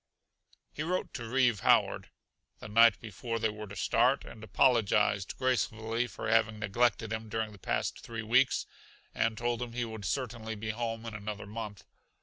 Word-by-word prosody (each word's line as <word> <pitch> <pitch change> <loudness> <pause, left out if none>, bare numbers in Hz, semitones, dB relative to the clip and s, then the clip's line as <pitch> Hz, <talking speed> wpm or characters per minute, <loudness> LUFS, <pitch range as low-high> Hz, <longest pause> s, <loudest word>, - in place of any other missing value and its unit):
He - - -5
wrote 180 +4 -2
to 120 -2 -5
Reeve 120 -4 +3
Howard, - - +3 0.5
the - - -9
night 115 0 +6
before 115 +2 -4
they 110 -1 +1
were 105 0 -8
to 100 - -9
start, 90 - +2
and 110 -2 -11
apologized 105 -3 +2
gracefully 115 -2 0
for - - -6
having 110 -1 +3
neglected 115 +1 +1
him 110 0 -5
during 110 0 -2
the 100 - -14
past - - -2
three 115 -2 -6
weeks 125 +4 +3 0.5
and 115 -1 0
told 120 0 -1
him 120 -1 -5
he 120 0 -1
would 110 -3 -7
certainly 115 -2 -3
be 110 +1 -3
home 115 0 -4
in 115 - -6
another 105 0 -5
month. 105 -1 -7
115 Hz, 170 wpm, -31 LUFS, 105-120 Hz, 0.5 s, night